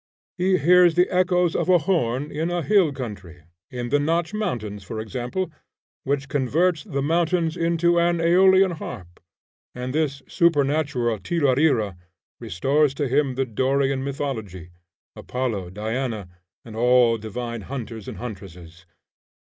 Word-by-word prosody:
He 185 0 +2
hears 175 0 +5
the 180 +1 +4
echoes 180 -2 +2
of - - -1
a 180 - +7
horn 145 -5 -1
in 160 +3 -2
a 175 -1 -1
hill 195 -6 +3
country, 100 - -8 0.3
in 120 -1 -5
the 145 +3 +2
Notch 165 +4 0
Mountains, 115 - -3
for 110 +3 -6
example, 125 - -4 0.5
which 140 0 -1
converts 150 +5 +1
the 140 0 -3
mountains 165 +1 +1
into 170 0 +2
an 170 0 +2
Aeolian 190 +3 +5
harp, 95 - -8 0.6
and 125 +1 -5
this 145 -3 -1
supernatural 140 - +1
tiralira 135 - +1 0.4
restores 135 - +1
to 145 -1 -1
him 135 0 +1
the 135 +1 0
Dorian 135 +3 0
mythology, 110 - -5 0.4
Apollo, 115 -8 -3
Diana, 110 0 -4 0.4
and 110 -2 -10
all 120 -1 +4
divine 115 +2 -5
hunters 115 -2 -7
and - - -7
huntresses. 90 -6 -10
135 Hz, 130 wpm, -23 LUFS, 115-165 Hz, 0.6 s, a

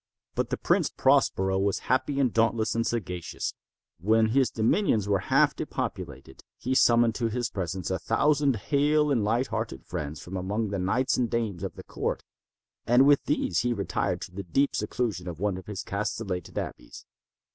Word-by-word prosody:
But - - -1
the - - -1
Prince - - +2
Prospero 95 0 +2
was 100 0 +1
happy 135 +2 +1
and 130 -5 +2
dauntless 115 -1 +2
and 115 0 0
sagacious. 90 -7 -3 0.5
When 110 +4 +3
his 130 +2 +3
dominions 110 - +1
were 100 -2 +2
half - - +4
depopulated, - - -5
he 130 - -2
summoned 120 -2 +4
to 115 0 -1
his 120 +1 -2
presence 95 -1 -3
a 95 - -1
thousand 140 +3 +2
hale 150 +6 +2
and 120 -6 +2
light 115 +5 +1
hearted 110 - -4
friends 80 -3 -5
from 90 - -8
among 105 +4 -2
the 100 -1 -2
knights 125 +9 +1
and 120 -2 +1
dames 110 -7 -2
of - - -4
his - - -10
court, - - -3 0.6
and 125 +3 +6
with 145 0 +5
these 90 - 0
retired 120 -5 -1
to - - -7
the 95 +2 -5
deep 135 +10 +1
seclusion 105 -4 -2
of 85 -2 -6
one 100 -1 0
of 95 - -9
his 105 -3 -5
castellated 100 -3 -4
abbeys. - - -6
110 Hz, 175 wpm, -27 LUFS, 95-125 Hz, 0.6 s, and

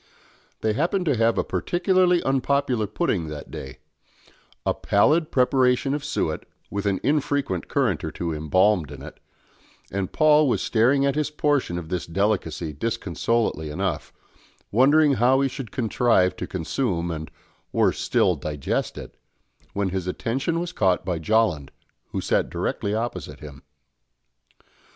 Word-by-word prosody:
They 110 -1 +1
happened 175 - 0
to 145 -5 +2
have 115 0 +2
a - - +2
particularly 180 0 +2
unpopular 135 -4 +1
pudding 105 - -1
that 75 -1 -8
day; 65 0 -8 0.9
a - - +2
pallid 150 +11 +2
preparation 130 +1 +2
of 145 - -3
suet, - - -2 0.2
with 100 0 -2
an 100 -1 +1
infrequent 145 - 0
currant - - 0
or - - -2
two 85 -2 -4
embalmed 85 +2 +2
in 70 -2 -9
it, 75 - -11 0.7
and 95 -1 -2
Paul 155 -1 +5
was - - 0
staring 130 +5 +3
at 140 - +2
his 150 +1 -1
portion 145 -11 0
of 85 -2 -6
this 90 -1 -3
delicacy 85 -4 -1
disconsolately 95 -1 -1
enough, 90 0 -3 0.6
wondering 145 +6 +5
how 130 +2 +5
he 140 - +2
should 130 -3 -6
contrive 115 -5 +2
to - - -4
consume 85 - -2
and, 80 -1 -5 0.4
worse - - +2
still, - - +2
digest 75 -3 -3
it, - - -9 0.6
when 100 -1 0
his 95 -1 -3
attention 135 - -1
was 175 0 -3
caught 95 - +1
by 90 -3 -1
Jolland, 95 -6 +1 0.4
who - - -3
sat - - +1
directly 100 +1 -2
opposite 115 +2 -4
him. 70 -2 -11
110 Hz, 145 wpm, -24 LUFS, 85-140 Hz, 0.9 s, Paul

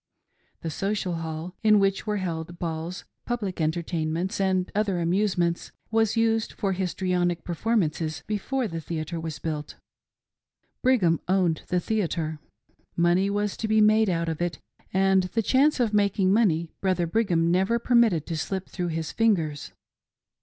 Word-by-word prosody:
The 165 - -3
Social 195 +1 -2
Hall, 160 +2 -5
in 215 -2 +5
which 195 +2 +1
were 210 0 0
held 170 -2 -4
balls, 165 +1 -4 0.2
public 205 -8 -2
entertainments, 165 +3 -1
and 190 -1 +1
other 200 -3 0
amusements, 175 -1 0 0.2
was 225 0 +2
used 225 -1 +1
for 195 - -1
his 185 -1 -2
trionic 175 -2 0
performances 165 -6 -1
before 235 +4 -1
the 165 -4 -5
theatre 160 +1 -4
was 160 -1 -5
built. 150 -2 -5 1.1
Brigham 200 - +3
owned 180 -4 +2
the 180 - +1
theatre. 165 -6 -2 0.6
Money 175 +3 +3
was 205 0 -1
to 220 - -2
be 220 0 +3
made 215 0 +5
out 170 -1 0
of 160 0 -3
it; 175 -1 -1 0.3
and 190 0 +3
the 225 - +2
chance 275 +6 +3
of 230 -4 +1
making 200 -2 +3
money 170 -7 +2
Brother 185 -3 +1
Brigham 170 -3 +1
never 190 +6 +2
per 240 +1 -2
mitted 220 -10 +4
to 165 - -3
slip 190 +3 -3
through 180 -2 -3
his 160 -2 -3
fingers. 165 -10 0
185 Hz, 155 wpm, -26 LUFS, 165-210 Hz, 1.1 s, in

